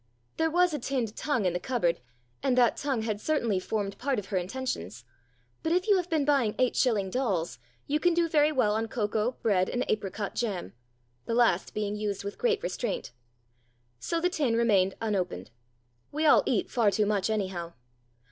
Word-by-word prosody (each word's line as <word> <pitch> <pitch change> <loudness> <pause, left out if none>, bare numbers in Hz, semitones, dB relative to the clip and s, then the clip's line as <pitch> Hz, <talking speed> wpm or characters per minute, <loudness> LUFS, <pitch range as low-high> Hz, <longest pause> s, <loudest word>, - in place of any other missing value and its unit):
There 320 0 +2
was 355 +1 +3
a 295 - -1
tinned 240 -4 -2
tongue 285 -9 -1
in 180 - +2
the 175 - -1
cupboard, 175 -6 0 0.4
and 255 -2 +1
that 245 -2 +4
tongue 265 -5 -1
had 215 -2 -2
certainly 235 -11 +1
formed 200 +1 -3
part 270 0 0
of 205 - -3
her 195 - 0
intentions; 175 - -4 0.6
but 320 - -1
if 365 +4 +1
you 405 -2 +5
have 360 -1 -2
been 315 -4 +1
buying 270 -7 +2
eight 255 -1 +2
shilling 205 -7 +1
dolls, 195 - -1 0.3
you 300 +2 0
can 350 +1 +2
do 340 -1 +3
very 305 -1 +3
well 240 -8 +2
on 220 +1 -1
cocoa, 220 +1 -1
bread, 190 -5 +2
and 245 - -1
apricot 205 -1 -2
jam 195 - -3 0.5
the 230 - 0
last 230 -7 +2
being 210 -1 -1
used 210 -2 -3
with 200 0 -6
great 455 -2 +1
restraint. - - -3 0.9
So 330 - -1
the 350 - +2
tin 290 -10 0
remained 200 -5 +3
unopened. 185 - -2 0.6
We 305 +2 -1
all 300 - +7
eat - - 0
far 230 -5 +3
too 210 +1 +1
much, 205 0 0
anyhow. 185 -5 -2
225 Hz, 185 wpm, -28 LUFS, 200-285 Hz, 0.9 s, all